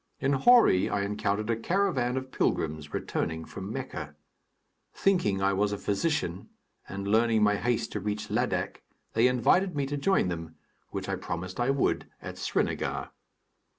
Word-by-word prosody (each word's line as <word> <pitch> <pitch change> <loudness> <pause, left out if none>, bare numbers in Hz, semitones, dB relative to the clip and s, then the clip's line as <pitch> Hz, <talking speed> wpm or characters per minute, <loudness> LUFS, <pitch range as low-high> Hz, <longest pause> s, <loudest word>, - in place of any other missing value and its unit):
In 140 +1 +1
Hori 140 - +5
I 100 - 0
encountered 105 +2 -1
a - - +2
caravan 130 - 0
of 130 0 -5
pilgrims 75 -1 -1
returning 80 0 -2
from 95 +2 -7
Mecca. 85 - -5 0.8
Thinking 105 - +2
I 100 0 +3
was 100 +1 +1
a 105 - -2
physician 100 - -1 0.4
and 100 0 -5
learning 110 +1 +3
my 105 0 +4
haste 120 +2 -1
to 105 - -3
reach 105 +1 -3
Ladak, - - -1 0.3
they 115 +3 +5
invited 150 - +3
me 140 -1 0
to 145 +1 -3
join 190 - +2
them, 80 -2 -5 0.3
which - - -5
I - - -1
promised 90 +3 -5
I 120 +2 +1
would 135 0 +1
at - - -8
Srinagar. - - -1
105 Hz, 155 wpm, -28 LUFS, 95-135 Hz, 0.8 s, Hori